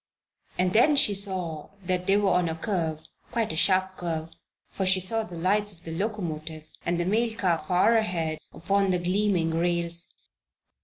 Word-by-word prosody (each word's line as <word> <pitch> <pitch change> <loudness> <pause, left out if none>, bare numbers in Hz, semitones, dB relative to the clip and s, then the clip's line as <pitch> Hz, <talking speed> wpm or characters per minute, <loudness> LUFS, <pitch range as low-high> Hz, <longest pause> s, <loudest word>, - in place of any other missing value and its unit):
And 180 0 +1
then 270 +7 +5
she 215 -7 +4
saw 185 -6 0 0.2
that 180 0 -1
they 195 +1 +4
were 205 -2 +2
on 180 -1 +2
a 160 - -3
curve 160 -4 -2 0.3
quite 225 -8 -1
a - - -5
sharp 185 +2 +2
curve, 165 -2 -4 0.4
for 195 - -3
she 185 0 +4
saw 225 +5 +2
the 180 -6 -8
lights 205 +4 +1
of 170 -1 -16
the 165 -1 -6
locomotive 160 -6 -4
and 175 0 -1
the 175 - 0
mail 225 +5 +1
car 180 -7 +1
far 180 +8 +2
ahead 170 -8 -1
upon 195 +3 0
the 180 - +2
gleaming 180 -1 +1
rails. 170 0 -1
180 Hz, 175 wpm, -26 LUFS, 165-200 Hz, 0.4 s, then